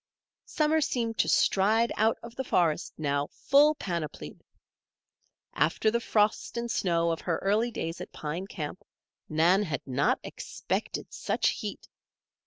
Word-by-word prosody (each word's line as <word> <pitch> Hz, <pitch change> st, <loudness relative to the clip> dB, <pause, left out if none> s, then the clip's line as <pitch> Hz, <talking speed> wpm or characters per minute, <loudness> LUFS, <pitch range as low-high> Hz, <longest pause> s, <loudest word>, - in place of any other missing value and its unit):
Summer 310 Hz, 0 st, +2 dB
seemed 230 Hz, -5 st, -1 dB
to -, -, +3 dB
stride 220 Hz, +4 st, +3 dB
out 220 Hz, +2 st, +2 dB
of 235 Hz, 0 st, -10 dB
the 265 Hz, -, -2 dB
forest 170 Hz, -10 st, +1 dB
now, 145 Hz, -1 st, 0 dB
full 295 Hz, +2 st, +4 dB
panoplied. 165 Hz, -, -5 dB, 1.1 s
After 165 Hz, +8 st, +2 dB
the 235 Hz, -, +1 dB
frost 215 Hz, 0 st, +1 dB
and 235 Hz, 0 st, -2 dB
snow 170 Hz, -4 st, +1 dB
of 165 Hz, -, -3 dB
her 165 Hz, -3 st, -1 dB
early 210 Hz, +5 st, +2 dB
days 165 Hz, -7 st, -5 dB
at -, -, -8 dB
Pine 165 Hz, +5 st, -5 dB
Camp, 165 Hz, -2 st, -6 dB, 0.5 s
Nan 170 Hz, +5 st, +4 dB
had 155 Hz, -9 st, -3 dB
not 135 Hz, +2 st, +1 dB
expected -, -, -4 dB
such -, -, 0 dB
heat. -, -, -5 dB
195 Hz, 140 wpm, -28 LUFS, 160-230 Hz, 1.1 s, full